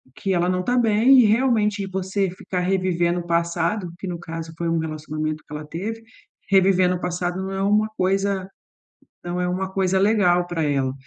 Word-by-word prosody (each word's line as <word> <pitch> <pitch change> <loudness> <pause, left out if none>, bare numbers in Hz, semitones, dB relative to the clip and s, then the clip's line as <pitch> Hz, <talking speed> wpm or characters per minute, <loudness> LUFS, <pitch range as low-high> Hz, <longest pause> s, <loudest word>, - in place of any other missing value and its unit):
que 195 - -2
ela 175 0 +1
não 185 0 0
tá 245 +5 0
bem 235 +3 +5
e 245 - +6
realmente 215 -3 +2
você 190 +1 -1
ficar 185 0 -4
revivendo 180 -2 +1
o 175 - -8
passado, 170 +3 0
que 195 - -6
no 175 -1 -4
caso 165 -1 -7
foi 170 - -2
um 165 0 +1
relacionamento 155 0 -4
que - - -10
ela 150 0 -6
teve, 210 +8 -5 0.5
revivendo 185 -2 +4
o 175 - -5
passado 175 +1 -2
não 190 0 -4
é 195 0 -3
uma 210 +2 +2
coisa 195 0 0 0.8
não 175 +1 -3
é 180 - 0
uma 185 +1 -2
coisa 190 0 +1
legal 190 -4 +3
para 175 -2 -2
ela. 135 -3 0
185 Hz, 190 wpm, -22 LUFS, 170-195 Hz, 0.8 s, e